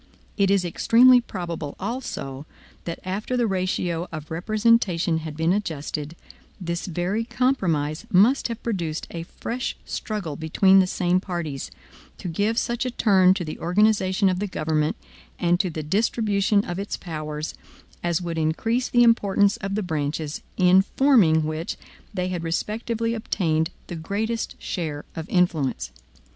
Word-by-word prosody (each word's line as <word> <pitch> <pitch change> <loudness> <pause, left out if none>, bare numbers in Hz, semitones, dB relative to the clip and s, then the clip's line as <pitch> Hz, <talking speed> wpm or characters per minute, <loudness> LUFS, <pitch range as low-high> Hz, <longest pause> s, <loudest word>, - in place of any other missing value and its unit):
It 200 -2 +2
is 195 -2 +3
extremely 245 +8 +6
probable, 170 -9 -5
also, 170 - -5 0.4
that 170 - -4
after 205 +7 -2
the 240 - +2
ratio 180 -3 -1
of 155 0 -7
representation 185 -3 +2
had 155 -2 -7
been 165 +2 +2
adjusted, 155 -5 -3 0.4
this 170 -1 -3
very 180 +6 -1
compromise 175 - 0
must 220 +9 +4
have 230 -1 -6
produced 170 -9 -2
a 165 - -5 0.2
fresh 245 +2 -3
struggle 200 -9 -4
between 190 +5 +4
the 185 - +4
same 180 0 +1
parties, 170 -8 -4 0.5
to - - -6
give 205 +7 0
such 240 +1 0
a 255 - -1
turn 190 -6 +4
to 180 - -3
the 155 - -6
organization 195 +1 +2
of 185 -1 +1
the 205 - -1
government, 155 -4 0 0.4
and 175 0 +2
to 190 - +1
the 155 -1 -5
distribution 205 +3 +1
of 175 +1 -4
its 200 - -3
powers, 155 -2 -5 0.5
as 175 0 0
would 165 -1 -3
increase 225 +11 0
the 240 0 +5
importance 205 -3 +3
of 195 0 -3
the 215 - -1
branches, 155 -2 -3 0.2
in 185 0 +6
forming 195 - +4
which 155 +2 -3 0.3
they 180 0 -2
had 180 -2 -3
respectively 225 +7 -2
obtained 165 -8 0 0.2
the 175 - -6
greatest 210 +8 -3
share 155 -5 -4
of 160 0 -6
influence. 160 - +1
180 Hz, 150 wpm, -24 LUFS, 160-210 Hz, 0.5 s, extremely